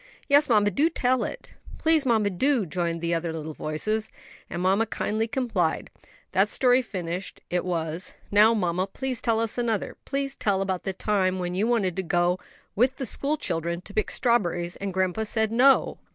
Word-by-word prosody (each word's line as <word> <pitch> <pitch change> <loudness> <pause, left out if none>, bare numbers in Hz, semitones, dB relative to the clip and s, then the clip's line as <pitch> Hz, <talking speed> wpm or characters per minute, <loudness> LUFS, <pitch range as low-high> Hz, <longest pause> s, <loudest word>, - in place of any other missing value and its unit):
"Yes, 285 0 +4
mamma, 205 -3 +4
do 300 +8 +2
tell 255 -6 +1
it." - - -7 0.2
"Please 315 -4 +2
mamma, 220 -4 +2
do," 245 +4 +1
joined 175 +1 -1
in 165 0 -3
the 170 0 0
other 165 0 -1
little 160 -1 -5
voices; 215 +10 -2 0.4
and 170 - -4
mamma 195 +5 +2
kindly 220 +2 -1
complied. 250 -1 -1 0.4
That - - +3
story 250 0 +4
finished, 185 -5 -5
it 180 0 0
was, 165 -1 -3 0.2
"Now, 215 +3 +6
mamma, 180 -2 0
please 255 +4 -4
tell 230 -2 +1 0.2
another; 230 -4 -1
please 275 0 -2
tell 195 -5 0
about 190 -2 -3
the 195 - -1
time 190 -1 0
when 180 -1 -3
you 200 +5 +1
wanted 205 -7 +1
to - - +1
go 175 0 +1 0.4
with 250 +5 +3
the 265 - -3
school 285 +4 -1
children 170 - -2
to 205 - -12
pick 215 - 0
strawberries, 175 -8 0
and 195 0 -4
grandpa 185 +2 0
said 220 0 0
'No.'" 260 +4 +4
205 Hz, 180 wpm, -26 LUFS, 180-240 Hz, 0.4 s, Now